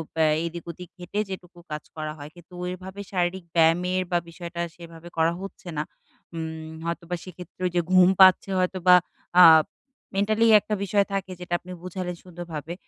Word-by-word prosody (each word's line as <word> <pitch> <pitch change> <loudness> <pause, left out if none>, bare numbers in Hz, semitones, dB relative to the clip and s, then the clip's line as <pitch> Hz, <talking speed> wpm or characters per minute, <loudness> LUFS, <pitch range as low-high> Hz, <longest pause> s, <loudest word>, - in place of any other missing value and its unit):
বে 160 - +3 0.2
এদিক 170 0 -6
ওদিক 180 +1 -11
হেটে 180 +4 -4
যেটুকু 180 -2 -9
কাজ 150 0 -4
করা 155 -1 -4
হয়। 145 0 -9
কিন্তু 175 +1 -17
ওইভাবে 185 +2 -6
শারীরিক 180 -1 -1
ব্যায়ামের 175 +3 +3
বা, 175 - +3
বিষয়টা 170 0 -6
সেভাবে 170 -1 -12
করা 165 +1 +3
হচ্ছে 195 -2 -9
না। 150 - 0 0.5
উম 160 -1 -5 0.2
হয়তোবা 170 +1 -3
সেক্ষেত্রে 180 0 -12
ঐযে 175 0 0
ঘুম 185 -1 +7
পাচ্ছে 190 +1 +7
হয়তোবা 180 0 +4 0.5
আব 160 -2 +8 0.5
মেন্টালি 215 +3 +2
একটা 210 +1 -3
বিষয় 200 +1 +2
থাকে, 195 -1 -2
যেটা 180 -1 -6
আপনি 180 - -12
বুঝালেন 180 0 -4
সুন্দরভাবে। 170 -3 -7
175 Hz, 160 wpm, -25 LUFS, 165-185 Hz, 0.5 s, আব